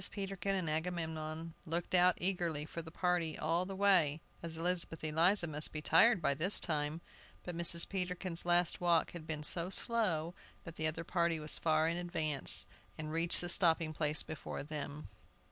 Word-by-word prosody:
Peterkin 195 Hz, -1 st, -4 dB
and 185 Hz, -3 st, -3 dB
Agamemnon 160 Hz, 0 st, -4 dB
looked 170 Hz, +3 st, -4 dB
out 180 Hz, 0 st, +4 dB
eagerly 175 Hz, -5 st, -2 dB
for 170 Hz, -, -7 dB
the 160 Hz, -, -11 dB
party 175 Hz, -1 st, -1 dB
all 170 Hz, +3 st, -1 dB
the 195 Hz, -, -6 dB
way, 180 Hz, -7 st, +3 dB, 0.2 s
as 165 Hz, -1 st, -2 dB
Elizabeth 170 Hz, -1 st, -1 dB
Eliza 170 Hz, +5 st, +4 dB
must 150 Hz, -2 st, 0 dB
be 150 Hz, -, -5 dB
tired 200 Hz, +4 st, +4 dB
by 140 Hz, -, +2 dB
this 175 Hz, +8 st, 0 dB
time; 155 Hz, 0 st, -3 dB, 0.4 s
but 175 Hz, -, -6 dB
Mrs. 170 Hz, 0 st, +7 dB
Peterkin's 180 Hz, -2 st, -3 dB
last 175 Hz, 0 st, +1 dB
walk 170 Hz, -2 st, +2 dB
had 165 Hz, -2 st, -10 dB
been 150 Hz, -1 st, -4 dB
so 170 Hz, +3 st, +1 dB
slow, 185 Hz, -7 st, -1 dB, 0.3 s
that 165 Hz, -, -10 dB
the 155 Hz, -, -1 dB
other 160 Hz, +1 st, -3 dB
party 170 Hz, -1 st, 0 dB
was 150 Hz, 0 st, +4 dB
far 155 Hz, -1 st, +1 dB
in 165 Hz, +1 st, -1 dB
advance 160 Hz, -5 st, 0 dB, 0.3 s
and 155 Hz, 0 st, -6 dB
reached 165 Hz, +2 st, +1 dB
the 175 Hz, -, -4 dB
stopping 165 Hz, -3 st, +1 dB
place 150 Hz, -1 st, 0 dB
before 155 Hz, -3 st, -7 dB
them. 150 Hz, 0 st, -7 dB
165 Hz, 175 wpm, -34 LUFS, 155-180 Hz, 0.4 s, Mrs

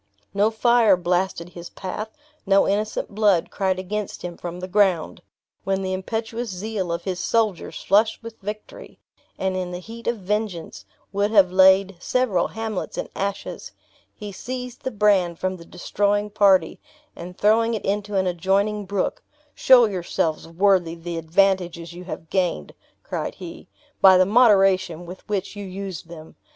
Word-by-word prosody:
No 205 Hz, +2 st, +3 dB
fire 225 Hz, -3 st, +4 dB
blasted 175 Hz, 0 st, -1 dB
his 175 Hz, -1 st, -10 dB
path; 210 Hz, +3 st, -6 dB, 0.3 s
no 195 Hz, 0 st, +3 dB
innocent 210 Hz, +1 st, -2 dB
blood 205 Hz, -5 st, +2 dB
cried 190 Hz, -2 st, 0 dB
against 200 Hz, +2 st, -5 dB
him 175 Hz, -1 st, -5 dB
from 175 Hz, +1 st, -7 dB
the 185 Hz, -, -5 dB
ground! 190 Hz, -4 st, +1 dB, 0.4 s
When 195 Hz, 0 st, -1 dB
the 185 Hz, 0 st, -2 dB
impetuous 225 Hz, +4 st, -4 dB
zeal 190 Hz, -1 st, -4 dB
of 170 Hz, -, -3 dB
his 185 Hz, -2 st, -3 dB
soldiers, 210 Hz, -1 st, -1 dB
flushed 215 Hz, +4 st, +2 dB
with 230 Hz, -1 st, -10 dB
victory, 210 Hz, +2 st, -8 dB, 0.4 s
and 190 Hz, 0 st, -1 dB
in 185 Hz, -1 st, -3 dB
the 180 Hz, -, -5 dB
heat 230 Hz, +6 st, -10 dB
of 235 Hz, -, 0 dB
vengeance, 205 Hz, -3 st, -4 dB, 0.3 s
would 200 Hz, +1 st, +1 dB
have 200 Hz, -4 st, +5 dB
laid 190 Hz, 0 st, +5 dB
several 215 Hz, -6 st, +1 dB
hamlets 220 Hz, -3 st, -5 dB
in -, -, -4 dB
ashes, 200 Hz, 0 st, -4 dB, 0.4 s
he 210 Hz, -1 st, -8 dB
seized 250 Hz, +4 st, -7 dB
the -, -, -2 dB
brand 200 Hz, -6 st, +2 dB
from 185 Hz, +1 st, -2 dB
the 170 Hz, -, -13 dB
destroying 205 Hz, +4 st, -1 dB
party, 195 Hz, -5 st, +3 dB, 0.4 s
and 180 Hz, +2 st, -9 dB
throwing 225 Hz, +2 st, +3 dB
it 215 Hz, -, -5 dB
into 205 Hz, +1 st, -2 dB
an 190 Hz, -1 st, +2 dB
adjoining 195 Hz, +4 st, 0 dB
brook: 195 Hz, 0 st, -2 dB, 0.3 s
"Show 255 Hz, -2 st, +6 dB
yourselves 175 Hz, -5 st, -2 dB
worthy 175 Hz, -1 st, +2 dB
the 170 Hz, 0 st, -5 dB
advantages 175 Hz, 0 st, +1 dB
you 180 Hz, +1 st, -10 dB
have 165 Hz, -2 st, -8 dB
gained," 180 Hz, -, -1 dB, 0.3 s
cried -, -, -4 dB
he, -, -, -10 dB, 0.3 s
"by 190 Hz, -1 st, +8 dB
the 185 Hz, -, +5 dB
moderation 195 Hz, -6 st, +3 dB
with 185 Hz, +4 st, -11 dB
which 200 Hz, 0 st, -2 dB
you 205 Hz, -, -6 dB
use 190 Hz, -2 st, -6 dB
them. 165 Hz, -2 st, -13 dB
195 Hz, 160 wpm, -23 LUFS, 180-210 Hz, 0.4 s, by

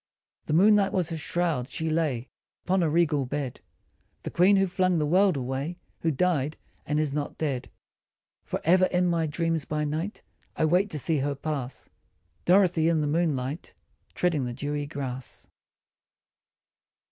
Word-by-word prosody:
The -, -, -1 dB
moonlight 200 Hz, +3 st, +5 dB
was 175 Hz, -3 st, 0 dB
her -, -, -2 dB
shroud, 160 Hz, -5 st, -1 dB
she 160 Hz, -, -3 dB
lay 155 Hz, -7 st, 0 dB, 0.4 s
Upon 185 Hz, 0 st, +2 dB
a 165 Hz, -, +2 dB
regal 150 Hz, -4 st, +2 dB
bed 140 Hz, -2 st, -4 dB, 0.6 s
The -, -, -5 dB
Queen 185 Hz, +4 st, +5 dB
who 195 Hz, 0 st, +4 dB
flung 185 Hz, -1 st, +1 dB
the 150 Hz, -, +1 dB
world 185 Hz, +1 st, +3 dB
away, 135 Hz, +6 st, -3 dB, 0.2 s
Who 165 Hz, -, 0 dB
died 155 Hz, -2 st, 0 dB, 0.3 s
and 150 Hz, 0 st, +1 dB
is 150 Hz, -3 st, 0 dB
not 145 Hz, -1 st, -3 dB
dead. 140 Hz, -5 st, -2 dB, 0.7 s
For -, -, -3 dB
ever 185 Hz, +3 st, +5 dB
in 180 Hz, 0 st, +1 dB
my 170 Hz, -2 st, +1 dB
dreams 165 Hz, +1 st, -1 dB
by 150 Hz, +1 st, -2 dB
night 160 Hz, +8 st, -3 dB, 0.3 s
I 160 Hz, -, +2 dB
wait 180 Hz, +6 st, +3 dB
to 155 Hz, -, -4 dB
see 155 Hz, +2 st, +1 dB
her 140 Hz, +1 st, -1 dB
pass 140 Hz, -3 st, -4 dB, 0.6 s
Dorothy 175 Hz, -3 st, +4 dB
in 160 Hz, -2 st, +2 dB
the -, -, 0 dB
moonlight 150 Hz, -2 st, -1 dB, 0.4 s
Treading 160 Hz, -7 st, +1 dB
the 120 Hz, -, -4 dB
dewy 145 Hz, +2 st, -3 dB
grass. 130 Hz, -4 st, -6 dB
155 Hz, 160 wpm, -27 LUFS, 145-175 Hz, 0.7 s, moonlight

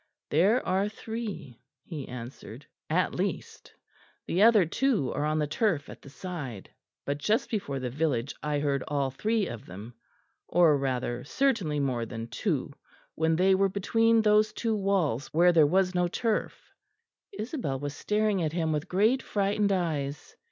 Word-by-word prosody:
"There 195 Hz, -, +3 dB
are 195 Hz, +2 st, +1 dB
three," 215 Hz, -, -7 dB, 0.2 s
he 150 Hz, -6 st, -7 dB
answered; 125 Hz, 0 st, -9 dB, 0.2 s
"at -, -, +1 dB
least; -, -, -4 dB, 0.5 s
the 180 Hz, -, 0 dB
other 215 Hz, -4 st, +6 dB
two 210 Hz, -, 0 dB
are 145 Hz, +2 st, -1 dB
on 155 Hz, +1 st, 0 dB
the 150 Hz, -, +1 dB
turf 155 Hz, -1 st, 0 dB
at -, -, -11 dB
the -, -, -13 dB
side 140 Hz, -, -7 dB, 0.3 s
but 140 Hz, +1 st, -2 dB
just 215 Hz, +9 st, 0 dB
before 145 Hz, -, -2 dB
the 125 Hz, -2 st, -4 dB
village 140 Hz, -3 st, -1 dB
I 150 Hz, -1 st, -1 dB
heard 140 Hz, -2 st, 0 dB
all 140 Hz, -2 st, 0 dB
three 215 Hz, -, 0 dB
of 120 Hz, -9 st, -7 dB
them 105 Hz, +7 st, -9 dB, 0.5 s
or 170 Hz, -4 st, +5 dB
rather 125 Hz, -3 st, -2 dB
certainly 205 Hz, -, 0 dB
more 125 Hz, -5 st, -1 dB
than 115 Hz, 0 st, -6 dB
two 140 Hz, -, -2 dB, 0.4 s
when 160 Hz, 0 st, +1 dB
they 190 Hz, +3 st, +4 dB
were 195 Hz, +1 st, +3 dB
between 225 Hz, +3 st, +2 dB
those 215 Hz, 0 st, +4 dB
two 225 Hz, -1 st, -1 dB
walls 190 Hz, -, 0 dB
where 175 Hz, +2 st, +6 dB
there 160 Hz, -4 st, +5 dB
was 185 Hz, +3 st, +2 dB
no 180 Hz, -1 st, +2 dB
turf." 220 Hz, +4 st, -2 dB, 0.6 s
Isabel 240 Hz, -, -3 dB
was 145 Hz, 0 st, -5 dB
staring 210 Hz, -2 st, 0 dB
at 155 Hz, -2 st, -1 dB
him 165 Hz, -2 st, 0 dB
with 150 Hz, 0 st, -3 dB
great 220 Hz, +8 st, +3 dB
frightened 205 Hz, 0 st, 0 dB
eyes. 150 Hz, -6 st, -2 dB
165 Hz, 160 wpm, -28 LUFS, 140-210 Hz, 0.6 s, other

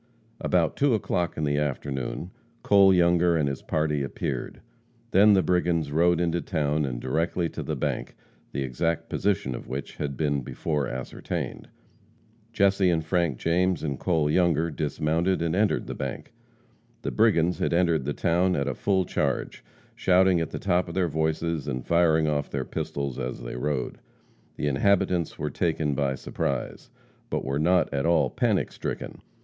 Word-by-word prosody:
About 85 Hz, -3 st, +1 dB
2 140 Hz, -4 st, +3 dB
o'clock 90 Hz, -4 st, -1 dB
in 80 Hz, -, -2 dB
the 70 Hz, 0 st, +1 dB
afternoon, 70 Hz, +3 st, -3 dB, 0.3 s
Cole 100 Hz, -1 st, +6 dB
Younger 85 Hz, -1 st, +4 dB
and 75 Hz, -3 st, +1 dB
his 70 Hz, -1 st, -3 dB
party 75 Hz, -2 st, 0 dB
appeared, 70 Hz, -, -4 dB, 0.5 s
then 105 Hz, +2 st, +6 dB
the 95 Hz, -2 st, +4 dB
brigands 85 Hz, -4 st, +1 dB
rode 85 Hz, +2 st, +3 dB
into 85 Hz, 0 st, 0 dB
town 75 Hz, -4 st, 0 dB
and -, -, -4 dB
directly 80 Hz, +7 st, 0 dB
to -, -, -6 dB
the -, -, -3 dB
bank, -, -, -3 dB, 0.4 s
the 70 Hz, -, -2 dB
exact 75 Hz, +6 st, -2 dB
position 95 Hz, -10 st, 0 dB
of -, -, -7 dB
which 70 Hz, +1 st, -6 dB
had 70 Hz, -2 st, -3 dB
been 70 Hz, -3 st, 0 dB
before 75 Hz, +3 st, -2 dB
ascertained. 65 Hz, 0 st, -5 dB, 0.8 s
Jesse 100 Hz, -3 st, +3 dB
and 80 Hz, -2 st, 0 dB
Frank 85 Hz, -6 st, 0 dB
James 90 Hz, +1 st, +1 dB
and 70 Hz, -4 st, -3 dB
Cole 80 Hz, -5 st, +1 dB
Younger 85 Hz, 0 st, +2 dB
dismounted 80 Hz, +4 st, 0 dB
and 85 Hz, 0 st, 0 dB
entered 105 Hz, +1 st, +1 dB
the -, -, -5 dB
bank. 65 Hz, -1 st, -6 dB, 0.7 s
The -, -, -2 dB
brigands 90 Hz, -6 st, +3 dB
had -, -, 0 dB
entered 85 Hz, -4 st, +2 dB
the 75 Hz, -, -1 dB
town 90 Hz, +3 st, +1 dB
at 70 Hz, 0 st, -1 dB
a 70 Hz, -, 0 dB
full 95 Hz, +5 st, +1 dB
charge, -, -, -2 dB, 0.3 s
shouting 95 Hz, -1 st, +3 dB
at 80 Hz, -, -2 dB
the -, -, -5 dB
top 90 Hz, +1 st, +1 dB
of 85 Hz, -, -7 dB
their 90 Hz, -3 st, +1 dB
voices 80 Hz, 0 st, -1 dB
and 65 Hz, -3 st, -3 dB
firing 80 Hz, -2 st, +3 dB
off 75 Hz, -1 st, -1 dB
their -, -, -3 dB
pistols 70 Hz, -3 st, -4 dB
as 60 Hz, 0 st, -4 dB
they -, -, -6 dB
rode. 70 Hz, +1 st, -2 dB, 0.6 s
The -, -, -3 dB
inhabitants 85 Hz, +3 st, +1 dB
were -, -, -3 dB
taken 80 Hz, -3 st, 0 dB
by 70 Hz, -1 st, 0 dB
surprise, 65 Hz, 0 st, -4 dB, 0.4 s
but -, -, -2 dB
were 70 Hz, +2 st, -1 dB
not 90 Hz, +1 st, +2 dB
at 70 Hz, +2 st, 0 dB
all 85 Hz, -1 st, +3 dB
panic -, -, +1 dB
stricken. -, -, -6 dB
80 Hz, 165 wpm, -26 LUFS, 70-90 Hz, 0.8 s, Cole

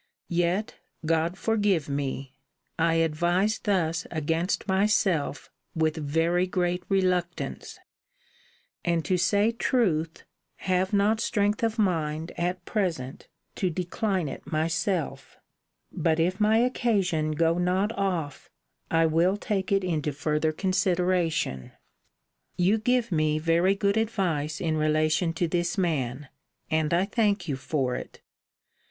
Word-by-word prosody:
Yet, 175 Hz, +4 st, 0 dB, 0.3 s
God 165 Hz, +2 st, +1 dB
forgive 205 Hz, -8 st, +1 dB
me! 135 Hz, -1 st, -3 dB, 0.5 s
I 165 Hz, 0 st, +3 dB
advise 175 Hz, +6 st, +1 dB
thus 165 Hz, -5 st, 0 dB
against 165 Hz, +5 st, -1 dB
myself 190 Hz, -, +1 dB, 0.2 s
with 160 Hz, -1 st, +1 dB
very 165 Hz, +4 st, +1 dB
great 180 Hz, -1 st, 0 dB
reluctance: 180 Hz, -3 st, -1 dB, 1.1 s
and, 170 Hz, -2 st, 0 dB
to 185 Hz, -, +1 dB
say 205 Hz, +5 st, +2 dB
truth, 185 Hz, -, 0 dB, 0.3 s
have 185 Hz, 0 st, 0 dB
not 210 Hz, +2 st, +2 dB
strength 205 Hz, -2 st, 0 dB
of 225 Hz, 0 st, 0 dB
mind, 165 Hz, -5 st, 0 dB
at 175 Hz, +1 st, -2 dB
present, 165 Hz, -, -3 dB, 0.3 s
to 185 Hz, -, +1 dB
decline 180 Hz, +1 st, -1 dB
it -, -, -8 dB
myself. 160 Hz, -2 st, -2 dB, 0.5 s
But, 165 Hz, -1 st, 0 dB
if 180 Hz, +4 st, +1 dB
my 215 Hz, +1 st, +4 dB
occasion 200 Hz, -10 st, +1 dB
go 165 Hz, +2 st, +2 dB
not 185 Hz, +4 st, +1 dB
off, 175 Hz, -9 st, -3 dB, 0.4 s
I 165 Hz, 0 st, +3 dB
will 170 Hz, +5 st, +2 dB
take 200 Hz, -2 st, -2 dB
it 195 Hz, -1 st, +3 dB
into 155 Hz, -5 st, -1 dB
further 150 Hz, +2 st, 0 dB
consideration. 180 Hz, -, 0 dB, 0.8 s
You 190 Hz, +5 st, +3 dB
give 240 Hz, 0 st, +1 dB
me 155 Hz, -2 st, +1 dB
very 170 Hz, +4 st, +2 dB
good 200 Hz, +1 st, +1 dB
advice 170 Hz, -9 st, -1 dB
in 160 Hz, -3 st, 0 dB
relation 155 Hz, +2 st, +2 dB
to 170 Hz, +1 st, 0 dB
this 175 Hz, +2 st, -1 dB
man; 145 Hz, -6 st, -1 dB, 0.4 s
and 155 Hz, -1 st, +1 dB
I 175 Hz, +3 st, +3 dB
thank 205 Hz, -3 st, 0 dB
you 145 Hz, -, -1 dB
for 135 Hz, -2 st, -1 dB
it. -, -, -8 dB
175 Hz, 120 wpm, -27 LUFS, 155-195 Hz, 1.1 s, my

